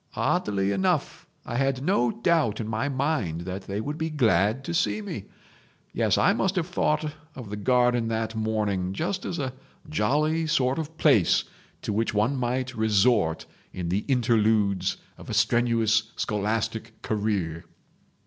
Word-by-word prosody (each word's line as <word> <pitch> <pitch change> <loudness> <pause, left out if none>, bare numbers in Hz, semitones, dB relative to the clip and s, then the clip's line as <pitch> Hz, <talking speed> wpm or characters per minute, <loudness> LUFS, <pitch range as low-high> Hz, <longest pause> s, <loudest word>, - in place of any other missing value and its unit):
Oddly 100 -1 0
enough 95 -1 -1 0.2
I 120 - -3
had 135 0 0
no 195 +8 +2
doubt 170 - +1
in 110 - -3
my 115 +6 -1
mind 130 - -1
that 95 +2 -6
they 100 +1 -3
would 145 +8 -4
be 160 0 -1
glad 115 - +2
to 170 - -4
see 175 - +1
me... 180 - -6 0.7
Yes, - - +2
I - - +4
must 190 +1 0
have 180 -3 +1
thought 155 -3 0 0.2
of 115 -6 -8
the - - -3
garden 120 +2 +2
that 110 0 -2
morning 105 -4 -1
just 185 - -2
as 170 - -3
a 130 -4 -3 0.3
jolly 155 +4 +1
sort 135 -3 +1
of 160 0 -6
place 135 - +4 0.4
to - - -2
which 110 0 0
one 110 +7 +2
might 130 0 -1
resort 105 -5 +2 0.3
in 90 -2 -4
the 95 +4 0
interludes 110 -6 +2 0.2
of - - -11
a - - -2
strenuous 115 -2 +2
scholastic 110 +2 -2
career. 100 -6 -2
115 Hz, 155 wpm, -26 LUFS, 105-145 Hz, 0.7 s, I